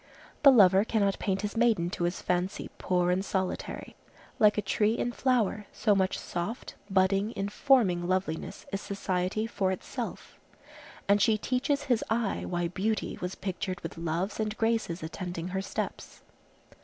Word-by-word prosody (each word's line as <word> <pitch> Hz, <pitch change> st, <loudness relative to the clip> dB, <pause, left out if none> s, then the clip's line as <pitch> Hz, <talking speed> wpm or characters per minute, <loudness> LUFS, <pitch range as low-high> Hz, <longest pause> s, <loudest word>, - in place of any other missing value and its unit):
The 280 Hz, -, +9 dB
lover 195 Hz, -5 st, +6 dB
cannot 205 Hz, -3 st, +1 dB
paint 195 Hz, 0 st, -1 dB
his 205 Hz, +1 st, -3 dB
maiden 220 Hz, -7 st, +2 dB
to 175 Hz, -, -1 dB
his 175 Hz, +1 st, -2 dB
fancy 180 Hz, +1 st, -1 dB
poor 180 Hz, -1 st, +1 dB
and 185 Hz, +2 st, +1 dB
solitary. 190 Hz, -2 st, -3 dB, 0.4 s
Like 210 Hz, -1 st, +5 dB
a -, -, +2 dB
tree 210 Hz, +3 st, +1 dB
in 240 Hz, -, -1 dB
flower, 230 Hz, -5 st, 0 dB
so 210 Hz, -, +2 dB
much 190 Hz, -1 st, +1 dB
soft, 180 Hz, +8 st, -4 dB, 0.2 s
budding, 195 Hz, +3 st, +2 dB
informing 200 Hz, -3 st, +2 dB
loveliness 185 Hz, -3 st, -2 dB
is 195 Hz, -, -2 dB
society 195 Hz, +1 st, -1 dB
for 195 Hz, -4 st, 0 dB
itself; 185 Hz, -, -6 dB, 0.7 s
and 200 Hz, +1 st, +4 dB
she 215 Hz, +1 st, +4 dB
teaches 255 Hz, +5 st, 0 dB
his 245 Hz, -4 st, +1 dB
eye 225 Hz, -2 st, 0 dB
why 175 Hz, -1 st, -1 dB
Beauty 205 Hz, +5 st, -2 dB
was 180 Hz, +1 st, -3 dB
pictured 185 Hz, -1 st, -4 dB
with 165 Hz, -, -6 dB
Loves 170 Hz, +5 st, -2 dB
and 215 Hz, -1 st, -2 dB
Graces 225 Hz, -7 st, 0 dB
attending 175 Hz, +1 st, -5 dB
her 190 Hz, +1 st, -2 dB
steps. 195 Hz, -, -5 dB
195 Hz, 155 wpm, -29 LUFS, 180-215 Hz, 0.7 s, The